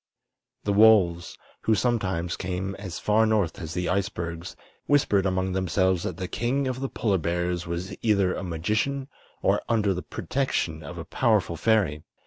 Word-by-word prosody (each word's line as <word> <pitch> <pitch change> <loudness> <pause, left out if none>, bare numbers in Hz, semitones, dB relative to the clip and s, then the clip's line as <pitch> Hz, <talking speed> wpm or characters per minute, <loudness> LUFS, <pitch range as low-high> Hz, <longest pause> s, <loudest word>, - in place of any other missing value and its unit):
The 100 - 0
wolves, 100 -5 +4 0.2
who 110 - +2
sometimes 95 -7 0
came 95 +1 -3
as 95 -4 -6
far 110 +1 +3
north 105 -6 +1
as 80 0 -6
the 90 -1 -1
icebergs, 90 -3 -3 0.3
whispered 105 -9 +3
among 95 0 0
themselves 95 0 +1
that - - -4
the 95 -1 -4
King 130 +7 -1
of 130 0 -3
the 135 0 -3
Polar 100 -5 0
Bears 85 +1 -1
was 90 +4 -4
either 100 -5 +2
a - - -4
magician 110 - -1 0.3
or - - +3
under 105 -4 +2
the 90 - -4
protection 85 - -2
of 70 - -8
a - - -6
powerful - - +1
fairy. 100 -10 +2
95 Hz, 160 wpm, -26 LUFS, 85-110 Hz, 0.3 s, wolves